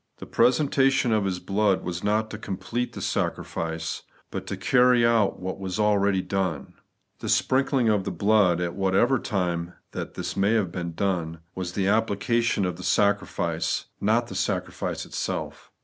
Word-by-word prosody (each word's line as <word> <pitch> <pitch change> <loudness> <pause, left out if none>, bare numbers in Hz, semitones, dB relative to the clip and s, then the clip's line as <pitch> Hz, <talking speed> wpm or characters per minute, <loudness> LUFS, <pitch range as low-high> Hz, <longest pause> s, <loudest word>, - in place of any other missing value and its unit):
The - - -8
presentation 135 0 +3
of 105 -2 +2
His 95 -2 -1
blood 100 +1 +1
was 90 0 -4
not 110 +1 +1
to 105 - -6
complete 120 +5 -3
the - - -6
sacrifice, 80 -1 -2 0.3
but - - -5
to - - -4
carry 125 -2 +4
out 115 -4 +2
what 95 +1 -5
was 95 +1 -4
already 100 -2 +2
done. 95 -7 -2 0.5
The - - -5
sprinkling 130 -2 +2
of 105 -3 +2
the - - -3
blood 100 -4 +3
(at 85 -1 -2
whatever 100 +7 +2
time 90 -5 -2 0.2
that - - -5
may 100 +3 +2
have 105 -6 +1
been 85 -2 -4
done) 85 -5 -1
was 90 -1 -4
the 95 -1 0
application 115 +1 +1
of 90 -2 -3
the 90 - -8
sacrifice, 100 -5 0
not 115 +4 +2
the 110 - -9
sacrifice 95 -1 -2
itself. - - -4
100 Hz, 160 wpm, -25 LUFS, 90-115 Hz, 0.5 s, carry